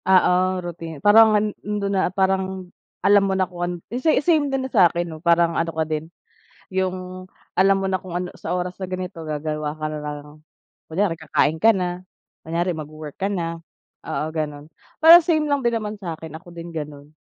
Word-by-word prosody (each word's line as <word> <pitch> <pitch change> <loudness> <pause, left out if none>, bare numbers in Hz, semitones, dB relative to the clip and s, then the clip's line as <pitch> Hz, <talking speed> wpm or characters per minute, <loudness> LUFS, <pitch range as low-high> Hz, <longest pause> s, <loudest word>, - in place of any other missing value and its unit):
Oo, 185 0 +4
routine. 165 -2 -7
Parang 215 +6 +7
an 210 - +1 0.2
andun 205 -1 -2
na, 190 -2 +2
parang 190 -1 -1 0.3
alam 205 0 +6
mo 190 -1 0
na 190 - +2
kung 175 -1 -10
an 175 0 -1 0.3
sa 320 - +2
same 305 -3 +2
din 270 -1 -1
na 265 - -7
sa 185 -7 +6
akin 175 +1 -2
'no, 160 -2 -8
parang 170 -1 +3
ano 165 0 0
ka 160 -1 -1
din, 155 +1 -4 0.6
yung 185 0 -3 0.3
alam 195 +1 +5
mo - - 0
na 185 - 0
kung 180 -1 -8
ano 180 0 -3
sa - - -4
oras 180 +1 -4
na 190 - -4
ganito 185 -1 -5
gagawa 150 0 -3
ka 155 0 -5
na 155 - -4
lang 150 0 -6 0.6
kunyari 180 +1 +1
kakain 160 0 +1
ka 225 - +7
na, 180 -1 -3 0.4
kunyari 170 +3 -1
magwo-work 155 -1 -8
ka 195 - 0
na, 165 -3 -3 0.5
oo, - - -2
ganun. 150 -1 -4 0.3
Parang 335 +2 +11
same 320 -3 +2
lang 285 -2 +1
din 235 - +2
naman 215 -1 -3
sa'kin, 165 -4 -6
ako 175 +1 -15
din 170 0 -7
ganun. 145 -2 -7
180 Hz, 195 wpm, -22 LUFS, 160-195 Hz, 0.6 s, Parang